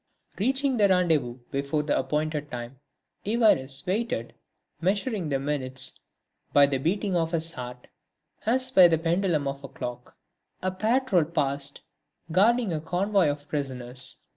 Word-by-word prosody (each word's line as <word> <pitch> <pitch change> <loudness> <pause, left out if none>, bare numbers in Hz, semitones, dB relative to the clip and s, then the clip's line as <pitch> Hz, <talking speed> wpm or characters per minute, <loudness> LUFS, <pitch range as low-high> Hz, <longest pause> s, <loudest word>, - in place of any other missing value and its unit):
Reaching 265 +4 +1
the 205 -2 +5
rendezvous 160 -10 +2
before 140 +2 -1
the 150 - 0
appointed 150 +2 -1
time, 120 +1 -7 0.4
Évariste 195 - +2
waited, 185 - -2 0.5
measuring 200 - 0
the 140 - +1
minutes 135 -2 -1 0.5
by 145 0 +7
the 140 -1 -1
beating 190 +6 -1
of 165 0 0
his 165 0 +3
heart 125 -3 -8 0.6
as 255 +3 +2
by 185 -7 +8
the 165 -1 +2
pendulum 165 -2 0
of 140 0 -5
a - - -6
clock. 125 -1 -8 0.5
A 185 - 0
patrol 215 - +2
passed, 140 -3 -2 0.5
guarding 215 +3 +3
a 155 - -2
convoy 185 +1 +1
of 145 0 -5
prisoners. 130 -3 -3
160 Hz, 140 wpm, -26 LUFS, 140-195 Hz, 0.6 s, by